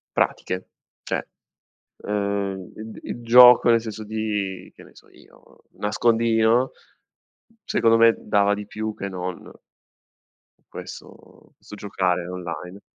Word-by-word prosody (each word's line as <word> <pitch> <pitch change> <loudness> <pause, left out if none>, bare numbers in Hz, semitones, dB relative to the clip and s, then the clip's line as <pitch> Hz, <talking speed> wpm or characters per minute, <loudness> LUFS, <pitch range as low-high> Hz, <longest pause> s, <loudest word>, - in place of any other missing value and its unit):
pratiche. 90 0 -1 0.4
Cioè, - - -3 0.8
uhm, 100 -2 -3
id 110 0 -9
il 120 - -7
gioco 125 +1 +8
nel 115 -1 +4
senso 110 -1 -7
di, 105 -4 -4
che - - -15
ne - - -18
so - - -19
io, - - -22
nascondino 115 +3 +2 0.9
secondo 115 - +3
me 115 0 +5
dava 100 -1 +2
di 105 0 -5
più 110 +1 -4
che 100 - -5
non 90 -1 -6 1.2
questo - - -12
questo 105 - -12
giocare 95 -4 -1
online. 90 +1 -7
105 Hz, 115 wpm, -23 LUFS, 95-115 Hz, 1.2 s, gioco